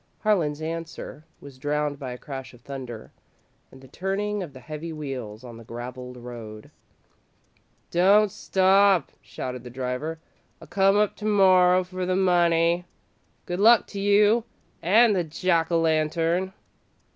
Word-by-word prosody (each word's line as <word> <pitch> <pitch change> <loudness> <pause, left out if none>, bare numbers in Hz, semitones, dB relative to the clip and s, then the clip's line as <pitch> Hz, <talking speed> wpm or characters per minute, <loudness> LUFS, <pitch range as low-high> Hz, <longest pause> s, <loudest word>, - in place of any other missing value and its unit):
Harlan's 160 -8 +1
answer 165 -1 -6
was 140 -2 -13
drowned 145 0 -2
by 130 -3 -5
a 125 - -7
crash 135 -2 -8
of 120 - -20
thunder 125 -4 -8 0.6
and 130 - -15
the 130 - -14
turning 200 +6 -3
of 175 -6 -6
the 130 - -12
heavy 155 +4 -7
wheels 130 -8 -6
on 120 -2 -10
the 115 - -12
gravelled 125 +2 -8
road. 115 -3 -10 1.2
"Don't 200 +4 +4
stop," 190 0 +3
shouted 125 -1 -7
the 125 - -9
driver; 130 +6 -4 0.4
"I'll - - -13
come 195 +1 +3
up 210 -1 +1
to 210 - -7
morrer 185 -3 +5
for 185 0 -5
the 185 - +1
money. 175 -2 +2 0.6
Good 175 +1 -4
luck 225 +2 +6
to 200 - -6
you 205 +3 +4 0.4
an' 215 +6 +5
the 180 -3 +1
Jack 165 +1 0
o' 165 - +3
Lantern!" 165 +3 0
165 Hz, 145 wpm, -25 LUFS, 130-190 Hz, 1.2 s, luck